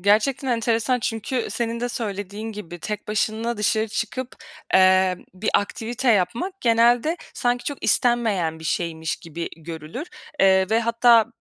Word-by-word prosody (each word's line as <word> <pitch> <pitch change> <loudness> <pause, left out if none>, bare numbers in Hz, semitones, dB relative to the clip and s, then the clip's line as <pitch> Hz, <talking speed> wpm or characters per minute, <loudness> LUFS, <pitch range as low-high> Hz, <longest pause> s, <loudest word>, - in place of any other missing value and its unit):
Gerçekten 220 +8 +2
enteresan 235 +1 +1
çünkü 225 +2 -2
senin 230 0 -2
de 245 - -1
söylediğin 210 -1 -4
gibi, 175 -5 -8
tek 210 +4 -5
başına 220 +2 -1
dışarı 215 +1 +1
çıkıp, 240 +4 -4 0.4
eee, 185 0 +5 0.2
bir 200 +4 -1
aktivite 235 +5 0
yapmak 235 - -1
genelde 240 +6 +3 0.2
sanki 245 -1 0
çok 285 - -5
istenmeyen 220 -10 +1
bir 160 - -11
şeymiş 160 -1 -2
gibi 165 +1 -6
görülür. 165 - -7 0.3
Eee, 190 -1 +5
ve 225 +1 +3
hatta, 235 0 +5
220 Hz, 135 wpm, -23 LUFS, 190-240 Hz, 0.4 s, eee